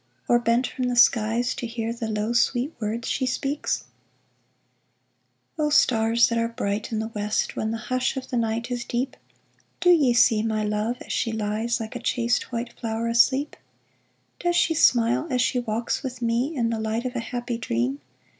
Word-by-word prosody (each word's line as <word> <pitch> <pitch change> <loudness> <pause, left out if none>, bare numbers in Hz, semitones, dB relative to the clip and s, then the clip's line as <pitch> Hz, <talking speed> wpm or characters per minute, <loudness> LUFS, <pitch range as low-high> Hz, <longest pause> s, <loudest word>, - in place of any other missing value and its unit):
Or 240 - +4
bent 235 +2 +2
from 255 - -3
the 245 - -1
skies 240 +1 +3
to 240 - -5
hear 230 0 -3
The 235 -1 -4
low, 215 +2 -1
sweet 250 +4 +1
words 225 +1 -3
she 260 - 0
speaks? 280 +3 -2 1.8
O 300 -1 +2
stars 230 -5 +4
that 230 0 0
are 230 - +1
bright 215 -3 -3
in 220 - -1
the 220 +1 -2
West 210 -1 -2
When 220 - -2
the 225 - -2
hush 255 +3 -1
of 260 - -6
the - - -1
night 230 +1 -1
is 245 -1 -2
deep, 250 +2 -2 0.6
Do 355 0 +5
ye 285 -8 +4
see 230 -2 +4
my 220 -1 -1
love 210 +3 -1
as - - -5
she 230 - 0
lies 220 +2 -1
Like 225 +1 -6
a - - -3
chaste, 240 0 0
white 235 0 -4
flower 225 0 -2
asleep? 265 +5 +3 0.8
Does 350 0 0
she 345 - +3
smile 245 -1 +3
as 255 - 0
she 250 0 +2
walks 230 0 -2
with 255 -3 -6
me 240 +6 0
In 235 -3 0
the 225 - -2
light 220 +2 -2
of 255 0 -3
a - - 0
happy 240 0 -4
dream. 130 - -1
235 Hz, 190 wpm, -25 LUFS, 225-250 Hz, 1.8 s, Do